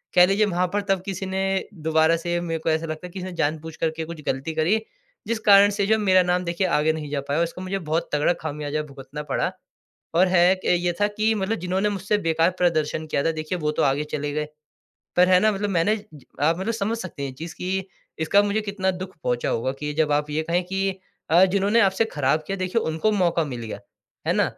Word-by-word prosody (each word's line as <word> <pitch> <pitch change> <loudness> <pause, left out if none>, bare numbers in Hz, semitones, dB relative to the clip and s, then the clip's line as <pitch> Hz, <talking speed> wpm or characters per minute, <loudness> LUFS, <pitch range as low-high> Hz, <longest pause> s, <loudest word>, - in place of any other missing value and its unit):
कह 180 0 +8
लीजिए 200 +3 +3
वहाँ 180 -2 0
पर 205 - +1
तब 195 -2 +2
किसी 195 -1 -4
ने 190 0 -2 0.5
दोबारा 160 +1 +4
से 175 +1 -2
मेरे 165 -2 -3
को 160 - -2
ऐसा 160 +1 +1
लगता 155 +2 -5
है - - -14
किसी 185 0 -6
ने 185 - -5
जानबूझ 160 0 -2
करके 160 0 -2
कुछ 165 -1 -8
गलती 135 +5 -2
करी, 160 +7 +3 0.5
जिस 230 -1 -1
कारण 200 0 +8
से 200 0 0
जो 220 - +4
मेरा 185 -3 +4
नाम 180 0 +1
देखिए 170 +2 0
आगे 160 -2 +2
नहीं 155 -2 -5
जा 145 -1 -1
पाया। 145 +4 +1
उसको 170 +2 -5
मुझे 190 +1 -3
बहुत 160 -1 -2
तगड़ा 150 +4 +3
खामियाज़ा 150 -1 -3
भुगतना 140 +1 -8
पड़ा। - - -1 0.6
और 180 +3 +5
है 180 0 +5
एक 185 0 -2 0.2
ये 175 -1 +1
था 205 - +5
कि 215 +1 +1
मतलब 210 +2 -1
जिन्होंने 185 +4 0
मुझसे 205 +1 0
बेकार 165 +2 +3
प्रदर्शन 160 -3 +1
किया 140 -2 0
था 165 - +3
देखिए 155 +3 -3
वो 150 -1 0
तो - - +4
आगे 140 +1 +2
चले 145 0 -3
गए। 150 0 -2 0.7
पर 180 +1 +6
है 180 -1 +6
ना 215 - +4
मतलब 205 +1 -2
मैंने 185 +3 +2 0.5
आप 165 +3 +3
मतलब 200 +5 -1
समझ 220 +2 -1
सकते 185 -8 -7
हैं 140 - -2
ये - - -13
चीज़ 160 +3 -7
कि 190 +1 -2 0.4
इसका 180 +6 +4
मुझे 205 +1 0
कितना 200 -2 -1
दुःख 185 0 -7
पहुँचा 120 -1 0
होगा 130 +3 -1
कि 150 0 -3
जब 150 -1 +1
आप 150 0 +1
ये 155 +2 0
कहें 175 +2 +2
कि 195 +2 -1 0.4
अ, 175 +3 +7
जिन्होंने 200 +4 +2
आपसे 195 +2 +3
खराब 145 +2 +1
किया 195 - -1
देखिए 185 +5 0
उनको 160 +7 0
मौका 170 -4 +2
मिल 125 -5 -6
गया, 110 -3 -6 0.5
है - - +4
ना। - - +3
175 Hz, 230 wpm, -24 LUFS, 155-190 Hz, 0.7 s, कह